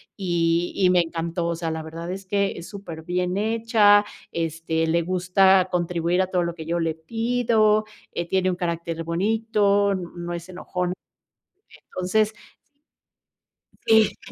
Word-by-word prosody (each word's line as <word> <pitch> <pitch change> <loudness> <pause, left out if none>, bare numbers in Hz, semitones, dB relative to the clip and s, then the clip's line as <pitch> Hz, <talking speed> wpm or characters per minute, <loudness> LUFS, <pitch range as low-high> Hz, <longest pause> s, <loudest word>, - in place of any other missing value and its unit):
y 175 -2 0
y 185 -2 +3
me 180 -1 +5
encantó. 170 +1 -3
O 170 - -1
sea, 165 -1 -3
la 160 0 -4
verdad 165 +2 -7
es 195 +1 -5
que 200 +1 0
es 170 - -8
superbién 180 -2 -4
hecha, 215 -1 +4 0.3
este, 165 0 -1
le 170 +1 +2
gusta 185 +1 +3
contribuir 175 0 0
a 185 - 0
todo 180 -2 0
lo 170 0 -3
que 160 -2 -8
yo 170 +1 -1
le 165 -1 -1
pido, 225 +3 +1 0.3
eh, 170 - -2
tiene 185 -1 +2
un 180 - -1
carácter 170 -1 -3
bonito, 200 +2 +1
no 175 -1 -5
es 170 0 -6
enojona. 180 0 -3 1.0
Entonces 215 +4 +1 1.5
Sí. 220 -1 +4
180 Hz, 145 wpm, -24 LUFS, 170-200 Hz, 1.5 s, me